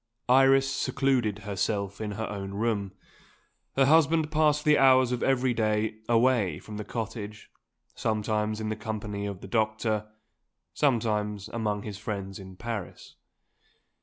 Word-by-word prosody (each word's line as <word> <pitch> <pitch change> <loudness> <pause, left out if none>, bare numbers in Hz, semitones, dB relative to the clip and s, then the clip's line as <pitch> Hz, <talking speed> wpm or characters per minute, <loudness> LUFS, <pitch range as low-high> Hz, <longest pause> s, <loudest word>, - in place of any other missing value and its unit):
Iris 135 +1 +6
secluded 130 -6 0
herself 100 0 -2
in 105 -1 -3
her 110 +2 -3
own 100 -1 -5
room. 105 -3 -1 0.8
Her 135 - +4
husband 160 +1 +4
passed 150 -1 +2
the 150 -1 +5
hours 130 -2 +5
of 125 - -1
every 130 -1 +2
day 110 -1 0
away 115 -8 +3
from 105 -1 -9
the 105 - -4
cottage; 110 -1 -6 0.4
sometimes 110 0 -1
in 110 -1 -3
the 110 - -1
company 105 -2 -4
of 100 -2 -6
the - - -8
doctor, 110 0 0 0.7
sometimes 105 -4 0
among 105 -3 -2
his 105 -2 -7
friends 100 -2 -5
in 95 -1 -10
Paris. 115 -2 -6
110 Hz, 135 wpm, -28 LUFS, 105-125 Hz, 0.8 s, Iris